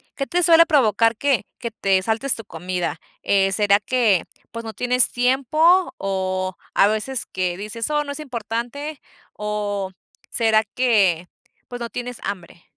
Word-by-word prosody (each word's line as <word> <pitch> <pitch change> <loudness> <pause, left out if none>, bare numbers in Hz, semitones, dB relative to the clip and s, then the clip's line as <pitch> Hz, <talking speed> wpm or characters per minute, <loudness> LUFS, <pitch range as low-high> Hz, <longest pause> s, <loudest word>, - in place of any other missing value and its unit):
qué 275 - -2
te 355 0 +1
suele 335 0 +7
provocar 230 - +3
que 270 -8 +1
que 235 -2 -5
te 195 -3 +1
saltes 225 +6 0
tu 225 - -7
comida?, 175 0 -4 0.2
eh, 195 -1 +2
¿será 205 0 +3
que, 225 -8 +2 0.3
pues, 230 +1 -6
no 220 -1 -7
tienes 250 +3 +3
tiempo, 305 +9 +3
o 185 -1 -2 0.2
a 200 - +5
veces 220 +4 -1
que 180 -1 -3
dices: 215 +5 -4
"Oh, 295 0 +1
no 285 - -5
es 310 - -7
importante" 250 +3 -5 0.3
o 205 -2 -3 0.4
será 220 -2 +3
que, 200 -9 +2 0.4
pues, 245 -1 -8
no 235 - -4
tienes 245 +2 -6
hambre? 180 -4 -6
225 Hz, 155 wpm, -22 LUFS, 195-255 Hz, 0.4 s, suele